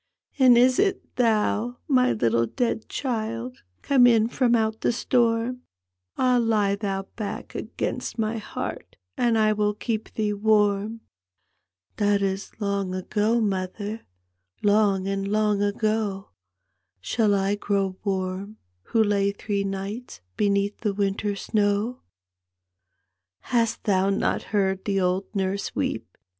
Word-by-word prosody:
" -, -, -35 dB
And 255 Hz, -2 st, +7 dB
is 250 Hz, +1 st, +4 dB
it 395 Hz, -1 st, 0 dB
thou, 230 Hz, 0 st, +1 dB
my 255 Hz, -3 st, +4 dB
little 115 Hz, +1 st, +1 dB
dead 230 Hz, -, -2 dB
child, 170 Hz, -, -3 dB, 0.2 s
Come 260 Hz, -3 st, +5 dB
in 225 Hz, -1 st, +4 dB
from 240 Hz, -2 st, +2 dB
out 220 Hz, -1 st, 0 dB
the -, -, +2 dB
stonn? 240 Hz, 0 st, +1 dB, 0.6 s
Ah, 250 Hz, -1 st, +3 dB
lie 210 Hz, -3 st, +2 dB
thou 195 Hz, -2 st, -3 dB
back 215 Hz, -3 st, -5 dB
against -, -, -4 dB
my 225 Hz, 0 st, -1 dB
heart, -, -, -6 dB, 0.2 s
And 235 Hz, -2 st, +2 dB
I 215 Hz, -1 st, +3 dB
will 210 Hz, 0 st, 0 dB
keep 220 Hz, 0 st, -3 dB
thee 210 Hz, -1 st, 0 dB
wann! 210 Hz, +1 st, +1 dB, 0.5 s
" 90 Hz, +1 st, -49 dB
That 205 Hz, -1 st, +2 dB
is 195 Hz, 0 st, -2 dB
long 200 Hz, -3 st, -1 dB
ago, 210 Hz, +5 st, +1 dB
mother, 205 Hz, +1 st, -2 dB, 0.6 s
Lang 205 Hz, -2 st, +3 dB
and 195 Hz, 0 st, -2 dB
long 210 Hz, 0 st, +1 dB
ago! 205 Hz, -1 st, -1 dB, 0.7 s
Shall 210 Hz, -, +1 dB
I 195 Hz, +1 st, +1 dB
grow 200 Hz, -2 st, -1 dB
warm 195 Hz, +1 st, -3 dB, 0.3 s
who 225 Hz, -, +2 dB
lay 200 Hz, -1 st, +2 dB
three 200 Hz, 0 st, -2 dB
nights 195 Hz, -, -5 dB, 0.2 s
Beneath 200 Hz, 0 st, +1 dB
the 210 Hz, -3 st, -1 dB
winter 200 Hz, +1 st, 0 dB
snowf 210 Hz, +4 st, 0 dB, 0.8 s
" 90 Hz, 0 st, -55 dB
Hast 230 Hz, -2 st, +1 dB
thou 195 Hz, -1 st, +2 dB
not 200 Hz, -, 0 dB
heard 190 Hz, -2 st, 0 dB
the 195 Hz, -1 st, +1 dB
old 185 Hz, +1 st, +1 dB
nurse 195 Hz, 0 st, -2 dB
weep? -, -, -3 dB
205 Hz, 135 wpm, -25 LUFS, 195-225 Hz, 0.8 s, And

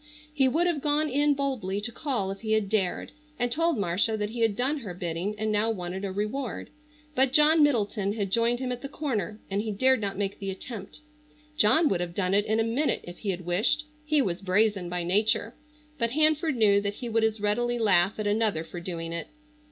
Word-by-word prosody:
He 270 Hz, -3 st, +3 dB
would 320 Hz, +7 st, +2 dB
have 340 Hz, -5 st, 0 dB
gone 300 Hz, +1 st, +1 dB
in 290 Hz, +2 st, +2 dB
boldly 250 Hz, -9 st, -2 dB
to 225 Hz, +3 st, -4 dB
call 235 Hz, -7 st, -2 dB
if 195 Hz, -, -7 dB
he 220 Hz, -1 st, -1 dB
had 215 Hz, -2 st, +1 dB
dared, 195 Hz, -4 st, -1 dB, 0.3 s
and 245 Hz, 0 st, -1 dB
told 330 Hz, +2 st, +1 dB
Marcia 200 Hz, +3 st, +1 dB
that 210 Hz, 0 st, -3 dB
he 240 Hz, -, -6 dB
had 225 Hz, -3 st, +2 dB
done 265 Hz, +6 st, 0 dB
her 200 Hz, -9 st, -7 dB
bidding 175 Hz, +4 st, -3 dB
and 215 Hz, 0 st, -1 dB
now 210 Hz, +2 st, +2 dB
wanted 185 Hz, -2 st, -4 dB
a 195 Hz, -, -2 dB
reward, 215 Hz, +6 st, -4 dB, 0.4 s
but 265 Hz, -2 st, +2 dB
John 305 Hz, +3 st, +5 dB
Middleton 210 Hz, -7 st, +1 dB
had 200 Hz, -3 st, -3 dB
joined 235 Hz, +3 st, +2 dB
him 255 Hz, 0 st, -3 dB
at 245 Hz, 0 st, -4 dB
the 275 Hz, -, -6 dB
corner 220 Hz, -, -3 dB
and 200 Hz, +1 st, 0 dB
he 215 Hz, 0 st, -3 dB
dared 260 Hz, +4 st, +3 dB
not 200 Hz, -2 st, -3 dB
make 200 Hz, -1 st, -2 dB
the 195 Hz, -, -4 dB
attempt. 200 Hz, +5 st, -7 dB, 0.5 s
John 305 Hz, +6 st, +4 dB
would 180 Hz, -2 st, 0 dB
have 170 Hz, -1 st, -4 dB
done 185 Hz, -1 st, 0 dB
it 205 Hz, +1 st, +2 dB
in 220 Hz, +1 st, +1 dB
a -, -, +3 dB
minute 245 Hz, +7 st, 0 dB
if 175 Hz, 0 st, -10 dB
he 210 Hz, -, -4 dB
had 180 Hz, -2 st, -3 dB
wished. 210 Hz, +12 st, +1 dB, 0.2 s
He 300 Hz, -2 st, +2 dB
was 180 Hz, -4 st, -3 dB
brazen 195 Hz, -1 st, +1 dB
by 175 Hz, 0 st, -2 dB
nature, 210 Hz, +5 st, +1 dB, 0.5 s
but 235 Hz, -1 st, +1 dB
Hanford 310 Hz, 0 st, +3 dB
knew 205 Hz, -3 st, +4 dB
that 200 Hz, 0 st, -3 dB
he 245 Hz, -, -6 dB
would 225 Hz, -1 st, +1 dB
as 220 Hz, 0 st, +1 dB
readily 240 Hz, +4 st, 0 dB
laugh 200 Hz, -3 st, +3 dB
at 215 Hz, -, -3 dB
another 205 Hz, -5 st, +1 dB
for 175 Hz, +2 st, -8 dB
doing 170 Hz, -1 st, -4 dB
it. 170 Hz, -, -4 dB
215 Hz, 220 wpm, -27 LUFS, 195-260 Hz, 0.5 s, John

